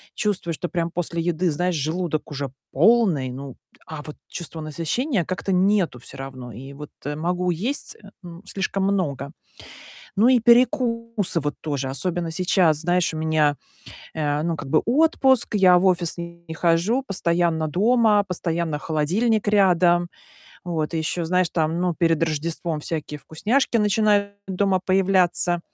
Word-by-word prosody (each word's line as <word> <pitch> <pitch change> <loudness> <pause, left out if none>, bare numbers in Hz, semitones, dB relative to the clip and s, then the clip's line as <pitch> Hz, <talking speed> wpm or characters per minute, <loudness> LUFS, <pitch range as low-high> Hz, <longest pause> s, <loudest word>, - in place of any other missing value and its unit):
чувствую, 195 -6 -1
что 175 - -4
прям 170 -1 -2
после 170 -1 -2
еды, 175 +1 0
знаешь, 175 +4 -1
желудок 155 +1 -2
уже 140 -2 -4 0.2
полный, 175 - +3
ну 135 0 -8 0.3
а 155 -2 -7
вот 150 - -9
чувства 170 -2 -8
насыщения 170 - -1
как-то 185 +2 -3
нету 185 -7 +2
всё - - -11
равно. 130 -2 -8
И 135 +6 -10
вот 150 +1 -9 0.3
могу 180 +3 -1
есть, 225 - -3
э, 200 - -13
м, 175 0 -10
слишком 195 0 -2
много. 150 -9 -1 0.9
Ну 220 +5 +5
и 255 -1 +5
перекусы 230 - +2
вот 145 0 -2
тоже, 140 -4 -3
особенно 170 +4 -2
сейчас. 175 -2 +2
Знаешь, 175 +1 +1
у - - -4
меня, 155 -2 +1 0.6
э, 150 -2 -1
ну, 165 0 -1
как 140 - -8
бы 155 +2 +3
отпуск, 265 -3 +3
я 185 -3 +6
в 190 - 0
офис 175 -2 +1
не 170 -1 -8
хожу, 175 +10 +1
постоянно 170 -6 0
дома, 215 - +3
постоянно 170 -4 -2
холодильник 185 +10 0
рядом. 175 -4 +3 0.6
Вот. 165 -3 -2
И - - 0
ещё, 165 +2 -2
знаешь, 180 0 +1
там, 160 +1 0
ну 180 -1 0
перед 165 -1 +1
Рождеством 160 0 -2
всякие 150 -1 -4
вкусняшки 225 - 0
начинают 210 -1 +2
дома 190 0 +1
появляться. 185 -2 +2
175 Hz, 150 wpm, -23 LUFS, 155-195 Hz, 0.9 s, я